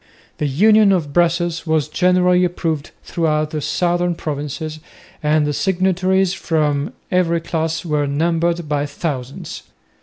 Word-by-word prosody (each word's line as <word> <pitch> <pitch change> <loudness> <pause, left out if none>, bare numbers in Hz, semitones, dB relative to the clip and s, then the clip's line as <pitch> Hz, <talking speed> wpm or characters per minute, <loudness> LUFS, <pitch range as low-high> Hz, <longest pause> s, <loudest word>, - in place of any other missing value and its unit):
The 150 - 0
Union 210 +8 +5
of 160 -7 0
Brussels 170 0 +1
was 155 -2 +1
generally 180 +2 +3
approved 165 -4 -2
throughout 155 -2 0
the 155 - -3
southern 175 +2 0
provinces, 155 +1 -5 0.4
and 150 0 +2
the 150 - -1
signatories 190 +2 +1
from 150 -5 -1 0.2
every 175 -2 +2
class 165 0 -2
were 150 -3 0
numbered 165 +3 0
by 145 -1 -1
thousands. 140 -4 -5
165 Hz, 125 wpm, -19 LUFS, 150-175 Hz, 0.4 s, Union